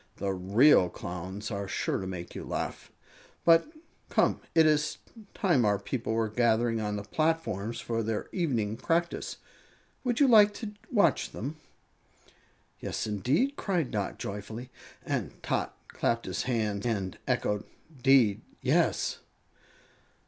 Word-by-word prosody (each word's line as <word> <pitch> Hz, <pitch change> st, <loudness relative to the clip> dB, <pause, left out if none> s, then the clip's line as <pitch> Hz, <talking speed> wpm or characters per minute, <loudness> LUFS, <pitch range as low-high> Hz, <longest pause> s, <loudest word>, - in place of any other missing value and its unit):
The 100 Hz, -1 st, -2 dB
real 95 Hz, +3 st, +5 dB
Clowns 95 Hz, +5 st, -6 dB
are 100 Hz, -1 st, -3 dB
sure -, -, -1 dB
to 95 Hz, -, -4 dB
make 90 Hz, -2 st, -6 dB
you -, -, -6 dB
laugh. -, -, -4 dB, 0.5 s
But 165 Hz, -, +5 dB, 0.4 s
come, -, -, +2 dB
it 160 Hz, -1 st, +7 dB
is 150 Hz, -1 st, +2 dB, 0.4 s
time 175 Hz, -, +3 dB
our 105 Hz, -1 st, +3 dB
people 110 Hz, +3 st, -3 dB
were 115 Hz, 0 st, +1 dB
gathering 115 Hz, 0 st, +2 dB
on 105 Hz, -1 st, -2 dB
the 100 Hz, -, -4 dB
platforms 120 Hz, -, -1 dB
for 115 Hz, -1 st, -2 dB
their 110 Hz, -1 st, -2 dB
evening 115 Hz, -, -1 dB
practice. 170 Hz, +5 st, -1 dB, 0.7 s
Would 245 Hz, -2 st, 0 dB
you 285 Hz, -, +6 dB
like 210 Hz, -4 st, +7 dB
to 220 Hz, -3 st, -5 dB, 0.2 s
watch 200 Hz, -, +3 dB
them?" 140 Hz, +8 st, -5 dB, 1.2 s
"Yes, -, -, -3 dB
indeed!" 130 Hz, -, +1 dB
cried 175 Hz, -9 st, -1 dB
Dot, 105 Hz, -4 st, -2 dB
joyfully; 110 Hz, +5 st, -6 dB, 0.3 s
and -, -, -2 dB
Tot -, -, -1 dB
clapped 115 Hz, 0 st, -1 dB
his 95 Hz, 0 st, -2 dB
hands 105 Hz, -4 st, 0 dB
and 100 Hz, -6 st, -2 dB
echoed: 105 Hz, 0 st, 0 dB, 0.4 s
"'Deed, 125 Hz, -6 st, +5 dB, 0.2 s
yes!" -, -, +1 dB
115 Hz, 135 wpm, -29 LUFS, 100-155 Hz, 1.2 s, it